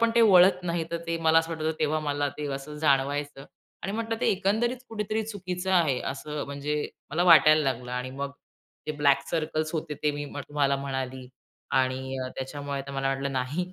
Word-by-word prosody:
पण 230 0 +4
ते 235 - +5
वळत 185 -3 +6
नाही, 170 -2 -1
तर 170 - -1
ते 170 - -1
मला 160 0 +6
असं 165 0 -1
वाटायचं 160 0 -2
तेव्हा 155 0 +1
मला 145 -1 -1
ते 150 - -4
असं 140 +2 -7
जाणवायचं 145 -1 +1 0.4
आणि 195 - -3
म्हटलं 225 +1 -2
ते - - +1
एकंदरीत 220 +6 +1
कुठेतरी 220 0 -2
चुकीचं 185 -3 -4
आहे, 155 -8 +3
असं 150 +2 -4
म्हणजे 140 +1 -3 0.4
मला 165 +4 +1
वाटायला 155 -2 +7
लागलं 125 0 -9
आणि 125 +1 -3
मग 140 +1 -4 0.6
ते 155 - -1
ब्लॅक 140 -2 +4
सर्कल्स 155 -1 -1
होते, 155 -2 -3
ते 150 - +3
मी 145 0 -4
तुम्हाला 145 -1 0
म्हणाली. 130 -2 -4 0.5
आणि 130 0 0 0.2
त्याच्यामुळे 140 +1 -4
आता 140 +1 -8
मला 135 0 -1
वाटलं 135 +1 -1
नाही. 145 +8 -2
150 Hz, 185 wpm, -27 LUFS, 140-175 Hz, 0.6 s, वाटायला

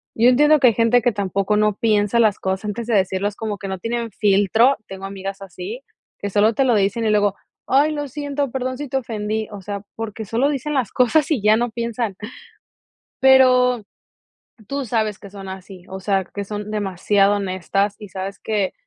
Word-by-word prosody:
yo 235 +3 +5
entiendo 295 +4 +5
que 260 - +6
hay 230 - +4
gente 230 +1 +3
que 240 +1 +2
tampoco 200 +1 -1
no 210 -1 +3
piensa 210 +1 +1
las 215 -3 +3
cosas 190 +2 -2
antes 215 +2 -4
de 235 - 0
decirlas 195 +1 0
como 215 -2 -4
que 195 0 -7
no 190 -1 -4
tienen 230 +1 -3
filtro, 205 +6 +3
tengo 195 0 -8
amigas 195 0 -6
así, 195 +6 -7 0.4
que 205 - -3
solo 210 +3 +3
te 270 - +2
lo 245 -3 +3
dicen 205 +3 +1
y - - +2
luego, 205 -2 +3 0.3
ay 290 +3 +3
lo 290 -1 -3
siento, 285 0 -3
perdón 255 0 -3
si 290 +1 -5
te 270 - -1
ofendí, 220 -3 -3
o 205 -2 -8
sea, 200 +1 -5
porque 225 0 -5
solo 240 +7 +1
dicen 295 +1 -3
las 255 -7 0
cosas 275 +5 +2
y 255 -9 +1
ya 215 +1 +4
no 240 0 -1
piensan 230 -2 -3 1.1
pero, 255 -3 +5 0.8
tú 275 -1 -3
sabes 215 -3 -1
que 200 - -11
son 195 -1 -10
así, 190 -1 -10
o 190 0 -7
sea, 195 0 0
que 200 +2 -6
son 210 +1 -6
demasiado 200 0 +2
honestas 195 +1 -1
y 210 - -10
sabes 190 +2 -6
que, 205 -3 -1
215 Hz, 195 wpm, -21 LUFS, 195-245 Hz, 1.1 s, que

